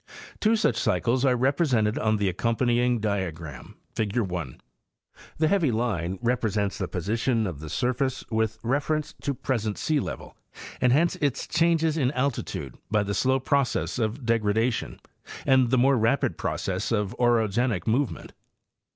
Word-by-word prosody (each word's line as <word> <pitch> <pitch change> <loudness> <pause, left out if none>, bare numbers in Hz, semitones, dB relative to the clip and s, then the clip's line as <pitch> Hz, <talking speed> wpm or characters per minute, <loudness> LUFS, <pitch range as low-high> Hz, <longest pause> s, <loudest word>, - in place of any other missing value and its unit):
Two 220 +1 +3
such 220 0 +1
cycles 115 +4 +1
are 130 -2 +4
represented 130 -4 +1
on 110 0 +1
the 100 -1 0
accompanying 120 +5 +1
diagram, 85 - -4 0.2
figure 110 +2 0
1. 90 -9 -5 0.8
The 155 - +2
heavy 165 -6 +2
line 100 -6 -1
represents 105 -5 0
the - - -2
position 110 +5 0
of 85 -7 -5
the 80 0 -8
surface 125 - -1
with 110 -1 0
reference 145 +4 -1
to 140 -1 -2
present 110 -6 -2
sealevel, 150 -3 -2 0.5
and 125 -1 +4
hence 165 +6 +3
its 145 -3 -1
changes 165 -1 +2
in 130 -5 +2
alti 135 -1 0
tude, 65 -3 -7
by 105 0 +2
the 100 0 -3
slow 130 +6 +2
process 135 -1 0
of 115 +3 -2
degradation 115 +1 0 0.5
and 130 -2 +4
the 130 - +3
more 130 +1 +4
rapid 115 +5 +1
process - - -2
of 105 0 0
orogenic 115 -4 +2
movement. 125 +4 -1
120 Hz, 145 wpm, -26 LUFS, 105-135 Hz, 0.8 s, are